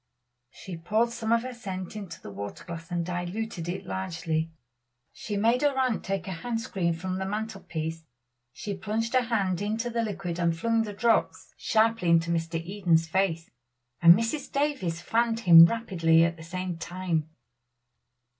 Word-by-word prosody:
She 180 - -9
poured 215 +8 +1
some 230 -1 -3
of 230 0 +3
her 255 0 -5
scent 190 -5 -6
into 200 - -8
a - - -7
water 100 +1 -7
glass 165 0 -8
and 175 -2 -1
diluted 175 +1 -4
it 190 +2 -4
largely. 165 -4 -2 0.6
She 205 -2 -4
made 230 +4 +3
her 290 -2 +2
aunt 255 -4 +1
take 195 0 -3
a - - -3
hand 225 +7 -3
screen 175 -6 -1
from 185 +2 -4
the 190 - -2
mantel 215 0 -4
piece. 160 0 -4 0.5
She 205 - -5
plunged 220 +5 -2
her 255 - +5
hand 200 -6 0
into 220 +4 -2
the 230 0 0
liquid 195 -6 -4
and 170 -1 +1
flung 230 +4 +1
the 210 - -6
drops 230 +3 0
sharply 225 -4 +2
into 170 0 +3
Mr. 165 0 -1
Eden's 170 -2 +1
face; 165 -2 0 0.5
and 170 0 +9
Mrs. 230 +7 -2
Davies 275 - -1
fanned 230 +4 +1
him 165 -5 +10
rapidly 170 -7 +2
at 170 0 +1
the 165 - -13
same 175 +1 -5
time. 175 -4 -2
190 Hz, 170 wpm, -27 LUFS, 170-225 Hz, 0.6 s, him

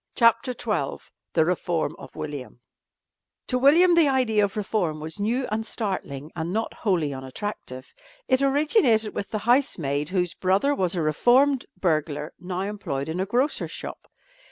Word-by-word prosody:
CHAPTER 230 +2 +3
XII 210 - -2 0.3
THE 160 - +3
REFORM 170 -3 -1
OF - - -12
WILLIAM 145 -5 -6 0.9
To 250 - 0
William 330 +7 +6
the 335 -3 +5
idea 250 -6 +2
of 200 +1 -1
reform 185 -7 -1
was 160 +6 -6
new 235 +6 0
and 220 +1 -1
startling 175 - -4
and 165 +1 -3
not 220 +3 -2
wholly 170 -9 0
unattractive. 130 0 -7 0.3
It 260 0 +3
originated 275 - +3
with 200 - -4
the 215 - -2
housemaid 165 - +1
whose 180 -2 0
brother 195 +12 +2
was 185 -8 0
a 170 - 0
reformed 250 - +3
burglar 155 -4 -1
now 180 0 -4
employed 190 -9 -3
in 165 +3 -3
a 190 - -1
grocer's 250 +8 0
shop. - - -8
200 Hz, 155 wpm, -25 LUFS, 160-245 Hz, 0.9 s, William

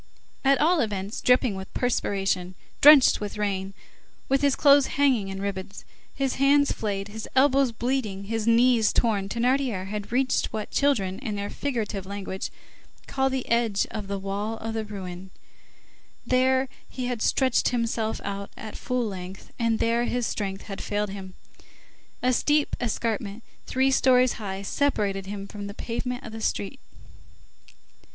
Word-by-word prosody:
_" - - -31 0.4
At 275 0 +5
all 330 +3 +4
events, 205 -3 -2
dripping 250 -2 +3
with 190 0 -7
perspiration, 195 -6 0 0.3
drenched 290 -5 +8
with 205 0 -5
rain, 195 -2 -2 0.5
with 270 0 +3
his 280 -2 +3
clothes 285 -1 +6
hanging 260 -8 +3
in 195 0 -5
ribbons, 200 0 -5 0.3
his 270 -2 -1
hands 285 +1 +5
flayed, 200 -2 -3
his 220 +1 -7
elbows 270 -1 +4
bleeding, 230 -4 -2
his 225 +2 -3
knees 230 -1 +4
torn, 205 -4 +1
Thénardier 240 -3 0
had 210 0 -5
reached 255 +2 +1
what 215 -1 -5
children, 200 -10 +1
in 225 -6 -4
their 205 0 -4
figurative 220 -8 -3
language, 195 -1 -5 0.6
call 270 0 0
the 265 -1 -3
edge 230 -4 +2
of 210 -3 -5
the 200 0 -2
wall 200 +3 -3
of 225 0 -5
the 220 -1 -2
ruin, 190 -3 -7 1.0
there 260 +1 +3 0.2
he 255 - -4
had 245 -3 -3
stretched 260 0 +2
himself 230 -2 -1
out 200 0 -4
at 220 - -8
full 250 -1 -1
length, 190 -2 -7
and 230 -1 +2
there 230 +2 +1
his 245 -1 -1
strength 195 -3 -3
had 195 -2 -7
failed 205 -1 -2
him. 190 -2 -8 0.9
A 255 0 +3
steep 295 +4 +2
escarpment 225 -2 -2 0.2
three 265 +1 +2
stories 255 -1 +4
high 195 -1 -4
separated 200 -6 0
him 200 0 -6
from 205 -1 -7
the 200 - -8
pavement 250 +3 -4
of 225 - -7
the 220 0 -7
street. 215 +4 -2
220 Hz, 155 wpm, -26 LUFS, 200-255 Hz, 1.0 s, drenched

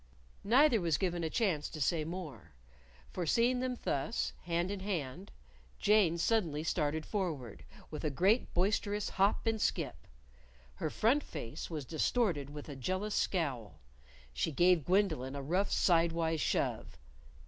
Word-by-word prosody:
Neither 245 +1 +5
was 165 -3 +1
given 175 -2 -1
a 160 - -1
chance 175 -8 0
to 155 - -8
say 155 +2 +1
more. 165 - -7 0.6
For 175 -3 -3
seeing 240 +7 +3
them 255 -1 -2
thus, 145 +12 -1
hand 175 +2 0
in 205 - -3
hand, 185 -2 -4 0.5
Jane 200 -5 +3
suddenly 170 -6 +1
started 155 -1 -1
forward 160 - -4 0.3
with 150 0 -6
a 155 - +1
great 190 - +2
boisterous 205 +2 +1
hop 195 +4 +1
and 225 -1 0
skip. - - -2 0.7
Her 65 - -3
front 240 - +2
face 150 - -7
was 155 -5 -5
distorted 160 - 0
with 145 0 -8
a 145 - -7
jealous 185 +10 -2
scowl. 125 - -1 0.5
She - - -1
gave 175 0 +3
Gwendolyn 165 -9 +1
a 140 - -4
rough 180 +8 0
sidewise 165 -2 +2
shove. - - -1
170 Hz, 145 wpm, -33 LUFS, 150-205 Hz, 0.7 s, Neither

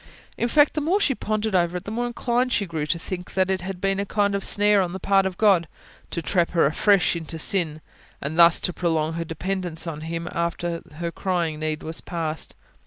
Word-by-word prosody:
In 235 - 0
fact, 290 +4 +4
the 305 - -1
more 350 +7 +2
she 295 -9 +2
pondered 215 -2 -2
over 175 -1 +2
it, 180 - -7
the 205 - -6
more 240 +2 -1
inclined 240 +1 0
she 205 - +1
grew 160 -4 -3
to 170 - +1
think 180 +2 -6
that 190 0 +2
it 190 -1 -1
had 185 0 -5
been 195 +1 0
a - - +1
kind 200 -1 +1
of 200 -1 -1
snare 205 0 +4
on 180 -1 -2
the 190 - -5
part 195 0 +3
of 185 -2 -6
God, 195 -6 +4 0.4
to 170 - -4
trap 175 0 +1
her 170 - +4
afresh 180 +5 +3
into 165 -1 -5
sin, 160 -2 0 0.4
and 155 +4 -4
thus 170 0 +7
to 180 - 0
prolong 160 -3 0
her 165 +1 -2
dependence 175 +1 -3
on 155 -3 -5
Him 165 +1 -4
after 170 0 -2
her 170 +1 -3
crying 170 -5 -1
need 155 0 -3
was 160 +1 -3
past. 160 -3 -4
180 Hz, 225 wpm, -24 LUFS, 165-200 Hz, 0.4 s, thus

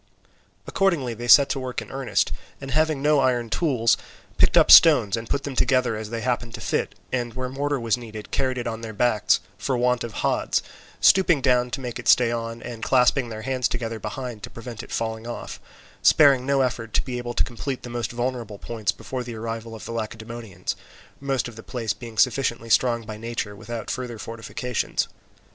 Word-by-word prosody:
Accordingly 165 -11 +1
they 120 +2 -6
set 140 +3 +8
to 135 - -1
work 130 -1 -4
in - - -10
earnest, 135 -2 0 0.3
and 135 -1 -7
having 155 -1 +1
no 150 -1 +4
iron 120 -4 +1
tools, 120 -8 +2 0.4
picked - - +5
up - - +6
stones, 105 +1 +8
and 115 0 -6
put 140 - -1
them 140 -2 -5
together 125 -3 +2
as 110 0 -6
they 115 0 -4
happened 120 -1 -2
to - - -8
fit, - - -2 0.2
and 120 -2 -2
where 130 0 -3
mortar 140 +1 -1
was 115 0 +1
needed, 110 -3 -9
carried 130 -1 0
it 120 - -3
on 115 0 -4
their 110 -1 -6
backs 105 -4 +2 0.2
for 130 +4 -1
want 125 0 +1
of 120 - -5
hods, - - +1 0.4
stooping 180 -5 +5
down 125 -1 +2
to 125 +2 -4
make 125 -2 -5
it - - -7
stay 120 -2 +5
on, 115 0 -4
and 120 -2 -7
clasping 125 +1 +3
their 110 -1 -7
hands 130 -2 0
together 115 -2 -4
behind 125 -2 -6
to - - -7
prevent 115 -1 -8
it - - -12
falling 110 0 -3
off; 120 - -6 0.4
sparing 135 -4 +5
no 140 -1 +3
effort 115 -3 -2
to - - +2
be 125 -2 -3
able 120 0 -5
to - - +3
complete 120 +3 -5
the - - -6
most 120 -1 -3
vulnerable 120 -3 -3
points 110 -1 -2
before 130 -1 -6
the 120 -1 -7
arrival 115 0 -5
of 110 - -9
the - - -6
Lacedaemonians, 110 -1 -5 0.4
most 135 -2 -1
of 120 - -10
the 110 - -9
place 115 -3 -3
being 110 +1 -10
sufficiently 120 -2 +1
strong 115 0 +3
by 110 -1 -7
nature 115 -2 -4
without 115 +2 -6
further 125 -3 -4
fortifications. 115 +2 -3
120 Hz, 200 wpm, -24 LUFS, 115-130 Hz, 0.4 s, set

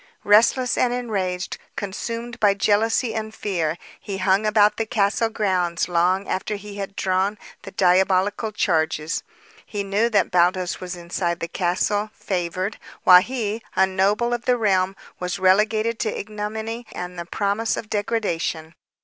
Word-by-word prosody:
Restless 230 +4 +4
and 245 - +3
enraged, 195 -7 -2 0.2
consumed 230 +4 -5
by 205 -2 +4
jealousy 220 +3 +2
and 220 0 -4
fear, 170 -7 -1 0.2
he 200 -2 -5
hung 195 +2 +2
about 210 -1 +4
the 225 - -1
castle 215 +1 +1
grounds 185 -6 0
long 180 +3 +1
after 210 +3 -2
he 205 0 -9
had 195 0 -5
drawn 190 +2 0 0.2
the - - -9
diabolical 190 +3 +2
charges. 160 -5 0 0.4
He 205 -2 -4
knew 205 +4 +1
that 205 -4 +2
Baldos 180 0 +2
was 180 0 -5
inside 170 0 -2
the 165 - -3
castle, 190 +4 0
favored, 185 +2 -3 0.2
while 180 -1 +9
he, 225 -1 -3
a 190 - +5
noble 200 +5 +1
of 240 0 -3
the 250 -1 +3
realm, 195 -4 +1 0.2
was 180 0 -2
relegated 215 +4 +2
to 215 - -2
ignominy 220 +2 -5
and 180 0 -6
the 170 - -5
promise 205 +4 -1
of 215 - -5
degradation. 195 -7 -2
200 Hz, 150 wpm, -23 LUFS, 185-220 Hz, 0.4 s, while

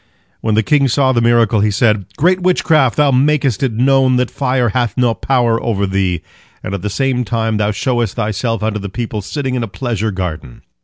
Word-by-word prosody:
When 110 -1 -1
the 110 - +2
king 140 +3 +2
saw 130 +1 +2
the 120 -2 +1
miracle, 115 -2 +3
he 105 +1 +2
said: 105 -1 +1
"Great 180 +5 +2
witchcraft! 165 -7 +2
Thou 145 -2 +3
makest 135 -2 +1
it 135 -3 +1
known 130 +2 +2
that 125 -1 0
fire 125 -3 0
hath 120 +3 -1
no 125 -2 +2
power 120 -2 0
over 100 -4 -1
thee, 95 -3 -1 0.4
and 95 - -5
at 100 - -4
the 105 - -3
same 130 +2 0
time 115 0 -1
thou 105 0 0
showest 120 0 -1
thyself 115 0 -2
unto 110 -1 -1
the 100 0 -6
people 110 0 -4
sitting 130 +5 -4
in 125 - -1
a 115 - -3
pleasure 110 +2 -3
garden." 90 - -6
115 Hz, 205 wpm, -16 LUFS, 105-130 Hz, 0.4 s, miracle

